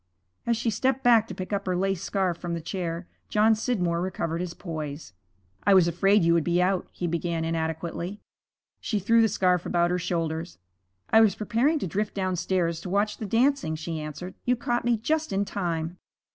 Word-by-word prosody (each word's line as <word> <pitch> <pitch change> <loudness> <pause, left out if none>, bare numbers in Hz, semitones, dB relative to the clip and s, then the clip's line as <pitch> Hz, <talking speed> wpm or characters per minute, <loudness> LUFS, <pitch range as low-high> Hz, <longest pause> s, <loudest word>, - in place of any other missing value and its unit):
As 235 -1 +2
she 230 0 0
stepped 260 +5 0
back 230 -2 +5
to 190 - -7
pick 185 +2 -5
up 200 -1 -2
her 180 -1 +1
lace 195 -1 0
scarf 190 -3 0
from 175 -1 -3
the - - -3
chair, 170 0 -4 0.2
John 215 +1 +4
Scidmore 190 -7 0
recovered 170 -2 -2
his 180 -1 -5
poise. 155 - -6 0.5
'I 200 - +5
was 180 -3 +6
afraid 195 +4 +3
you 170 0 +4
would 170 -2 +3
be 175 +2 +1
out,' 185 0 +1
he 180 - -4
began 170 -1 -1
inadequately. 165 +4 -3 0.6
She 215 - -2
threw 230 +4 +4
the 225 - +5
scarf 180 -3 +2
about 175 0 +1
her 180 - 0
shoulders. 165 - -2 0.5
'I 220 - +7
was 215 -4 +4
preparing 240 +9 +1
to 285 - -2
drift 205 +4 -2
downstairs 180 -3 0
to 180 - -6
watch 205 +2 +1
the 215 - -5
dancing,' 230 - +2
she 160 +1 -4
answered. 155 +5 -7
'You 250 - +2
caught 240 0 -1
me 240 -1 +3
just 310 +8 -1
in 195 +1 +1
time.' 170 -3 -3
185 Hz, 195 wpm, -26 LUFS, 170-210 Hz, 0.6 s, I